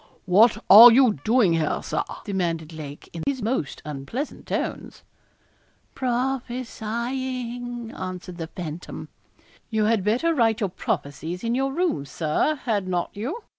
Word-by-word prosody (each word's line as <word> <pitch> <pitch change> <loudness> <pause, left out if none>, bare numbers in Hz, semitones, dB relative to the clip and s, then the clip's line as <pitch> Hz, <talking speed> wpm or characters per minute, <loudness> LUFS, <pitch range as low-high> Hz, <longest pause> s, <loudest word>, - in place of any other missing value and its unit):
'What 210 +5 +5
are 230 +5 +11
you 235 - +4
doing 220 -6 +4
here, 160 -2 0
Sir?' - - -1 0.2
demanded 170 -5 -2
Lake, 150 -2 -9
in 165 - -6
his 265 -5 -1
most 220 - -2
unpleasant 150 - -5
tones. - - -4 0.9
'Prophesying,' 245 -1 -3
answered 180 -1 -7
the 165 - -4
phantom. 170 -1 -7 0.6
'You 220 -2 +1
had 220 -3 +2
better 245 - +2
write 225 -6 +2
your 200 -4 0
prophecies 165 +2 -4
in 230 0 0
your 270 +2 0
room, 305 - -1
Sir 155 - 0
had 205 -6 0
not 175 -1 -1
you? 270 - -5
220 Hz, 130 wpm, -24 LUFS, 175-250 Hz, 0.9 s, are